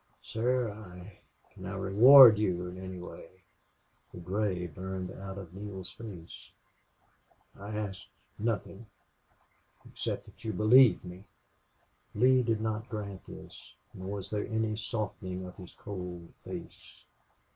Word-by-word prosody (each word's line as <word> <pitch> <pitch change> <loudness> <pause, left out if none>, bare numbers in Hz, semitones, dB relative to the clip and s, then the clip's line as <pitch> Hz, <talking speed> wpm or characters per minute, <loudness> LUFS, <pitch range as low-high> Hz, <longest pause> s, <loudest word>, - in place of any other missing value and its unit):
"Sir 120 0 0
I 105 - -11
I 90 -1 -12
" - - -35
"Can 95 - -9
I 95 - -5
reward 110 +5 +9
you 90 -4 0
in 90 +1 -8
any 95 -1 -7
way?" 90 -1 -10 0.8
The - - -11
gray 90 0 -1
burned 95 +2 -5
out 95 0 -8
of 90 -3 -9
Neale's 95 -2 -7
face. 95 -8 -10 1.1
"I 100 +1 -9
ask 100 -3 -4 0.4
nothing 110 -1 -3 1.0
except - - -4
that - - -18
you 110 - -2
believe 110 +4 +6
me." 90 +3 -10 0.9
Lee 130 +4 +5
did 115 -2 0
not 110 +1 -3
grant 100 -3 -6
this, - - -12 0.2
nor 95 +2 -6
was 100 -1 -6
there 105 -1 -2
any 110 -1 -1
softening 105 -4 -4
of 90 - -10
his 90 -3 -12
cold 90 -4 -7
face. - - -10
100 Hz, 135 wpm, -30 LUFS, 90-110 Hz, 1.1 s, reward